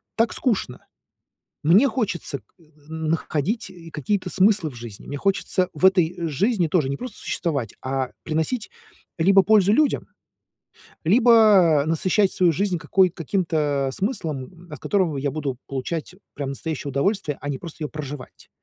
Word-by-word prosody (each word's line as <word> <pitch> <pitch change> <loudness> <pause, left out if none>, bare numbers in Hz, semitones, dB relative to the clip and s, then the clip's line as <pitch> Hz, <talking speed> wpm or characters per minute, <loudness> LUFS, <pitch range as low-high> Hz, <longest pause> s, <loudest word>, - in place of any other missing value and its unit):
так 230 0 +1
скучно. 195 - -2 0.8
Мне 200 - +6
хочется 195 - -2
к - - -35 0.2
э, - - -21 0.3
н 160 -1 -4
находить 165 - -1
и 170 -2 -12
какие-то 185 +5 -2
смыслы 195 -5 +3
в - - -14
жизни. 115 -4 -10
Мне 145 - -5
хочется 190 -1 0
в 190 - +4
этой 175 -2 +2
жизни 185 - +1
тоже 155 -5 +1
не 140 - -2
просто 250 -4 -7
существовать, 140 - -3
а, 130 -1 -2
приносить 160 +9 -2 0.5
либо 195 +3 +6
пользу 205 -1 +4
людям, 295 +4 +2 1.0
либо 210 - +6
насыщать 185 +5 +2
свою 180 -2 +3
жизнь 185 +3 0
какой 190 -2 +3
каким-то 155 -5 -1
смыслом. 175 - -4
От 150 - -8
которого 180 -8 0
я 140 0 -1
буду 140 -5 -3
получать 155 +6 -4 0.2
прям 140 -2 -4
настоящее 145 +1 -4
удовольствие, 150 +1 0
а 145 - -5
не 135 - -2
просто 165 -2 -8
её 150 - -1
проживать. 145 -3 -8
170 Hz, 150 wpm, -23 LUFS, 145-195 Hz, 1.0 s, Мне